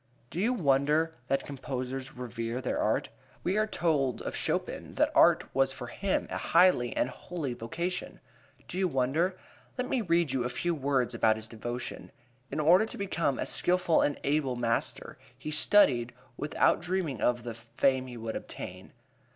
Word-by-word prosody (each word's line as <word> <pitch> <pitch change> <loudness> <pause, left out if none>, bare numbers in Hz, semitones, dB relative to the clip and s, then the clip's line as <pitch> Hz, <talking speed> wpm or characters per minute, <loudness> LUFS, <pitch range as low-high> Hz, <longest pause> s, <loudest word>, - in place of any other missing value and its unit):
Do 170 - -4
you 230 +5 +2
wonder 150 - +2
that 135 - 0
composers 130 -1 -5
revere 120 -1 -4
their - - -2
art? - - +1 0.3
We 185 - 0
are 215 0 +2
told 150 - 0
of - - -4
Chopin - - -2
that - - +2
art - - +6
was 135 0 +3
for 125 - -6
him 195 +8 -1
a - - -2
high 180 +2 +5
and 120 -4 -1
holy 145 +1 -5
vocation. 170 +11 -4 0.5
Do 185 - -4
you 190 - +3
wonder? 155 +6 0 0.4
Let 250 0 -1
me 255 -2 0
read 170 - +2
you 130 -2 0
a 125 - -1
few 170 +7 -1
words 135 -4 0
about 110 -1 +3
his 110 0 -5
devotion: 120 +2 -6 0.4
"In 145 - -3
order 180 +8 +5
to - - -8
become 170 -8 -1
a - - -2
skilful 180 -2 +3
and 145 - 0
able 140 -3 +1
master 115 -1 -2 0.2
he 150 +4 -6
studied, 135 - +4 0.2
without - - +2
dreaming 175 - -2
of 120 -1 +1
the... 120 -1 -5
fame 130 +3 0
he 120 -1 -8
would 115 -1 -5
obtain." - - -7
135 Hz, 170 wpm, -29 LUFS, 125-175 Hz, 0.5 s, art